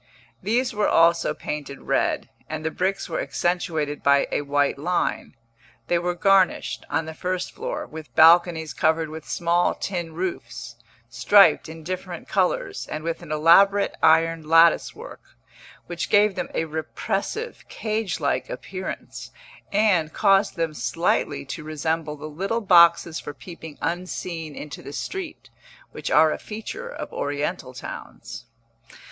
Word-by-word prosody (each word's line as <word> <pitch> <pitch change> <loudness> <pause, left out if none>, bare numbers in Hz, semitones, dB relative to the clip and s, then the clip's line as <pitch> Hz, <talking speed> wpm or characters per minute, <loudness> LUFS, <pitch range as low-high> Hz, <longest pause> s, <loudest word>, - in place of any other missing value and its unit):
These 245 +4 0
were 210 -1 +1
also 170 +1 +3
painted 145 -2 -6
red, - - 0 0.2
and 155 0 -5
the 160 - 0
bricks 190 +3 -1
were - - -2
accentuated 160 -4 -1
by 140 0 +4
a - - 0
white 145 -1 0
line; 175 +4 -1 0.5
they 175 - +3
were 175 +1 -2
garnished, 195 +1 +2
on 160 - 0
the 160 - -7
first 180 +3 -3
floor, - - -5
with 155 -1 -11
balconies 165 -2 +5
covered 160 +1 +1
with 160 0 -9
small 170 0 +1
tin 175 -4 -4
roofs, 115 -10 -5 0.3
striped 165 - +4
in 160 0 -10
different 185 +2 -6
colours, - - -1
and 155 - -5
with 165 +1 -3
an 170 -3 -10
elaborate 195 +6 +5
iron 165 +1 +4
lattice 165 +1 +5
work, - - -10 0.6
which 175 -1 -4
gave 205 0 +4
them 180 -1 -4
a 165 - 0
repressive, 195 - -4
cage 215 -3 -2
like 145 -2 -1
appearance, 185 -1 -7 0.4
and 195 -7 +2
caused 195 -1 +3
them 165 -2 -1
slightly 145 0 -1
to 155 +3 -6
resemble 155 0 -2
the 150 +1 -9
little 195 +10 -2
boxes 170 -3 +5
for 145 - -8
peeping 160 -3 -10
unseen 170 -2 -4
into 150 - -8
the 140 - -9
street, 380 - -6 0.4
which - - -5
are 160 -1 +5
a - - -3
feature 225 - -7
of - - -7
oriental 145 0 -3
towns. 125 - -9
165 Hz, 140 wpm, -24 LUFS, 155-190 Hz, 0.6 s, balconies